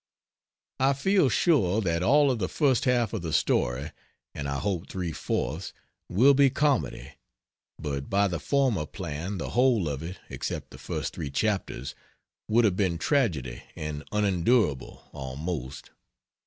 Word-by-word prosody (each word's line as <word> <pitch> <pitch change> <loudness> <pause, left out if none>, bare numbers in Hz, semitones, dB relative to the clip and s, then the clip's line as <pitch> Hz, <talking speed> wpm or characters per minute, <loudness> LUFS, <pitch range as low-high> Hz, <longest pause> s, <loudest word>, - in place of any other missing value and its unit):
I 135 +1 +4
feel 185 +2 +3
sure 115 - +3
that 85 -4 0
all 140 +7 +4
of 120 - -2
the 95 - -1
first 140 -3 +2
half 120 -3 +2
of 110 - -2
the 80 -2 -4
story 65 -1 +1 0.4
and 70 -1 -4
I 70 - -1
hope 95 0 -2
three 90 -3 -3
fourths 75 +3 -3 0.4
will 130 +9 +5
be 140 0 +5
comedy; 140 0 0 0.7
but 70 -3 -4
by 100 +1 +3
the 85 -3 -3
former 120 - +1
plan 85 +2 -5
the - - -4
whole 120 -8 +3
of 70 -2 -3
it 85 +3 -6
(except - - -5
the - - -12
first - - -4
3 70 - -5
chapters) 95 - -2 0.5
would 115 +2 +4
have 100 -4 +2
been 95 -4 +1
tragedy 80 - 0
and 75 -1 -5
unendurable, 100 - +1
almost. 70 0 -5
95 Hz, 150 wpm, -27 LUFS, 75-125 Hz, 0.7 s, will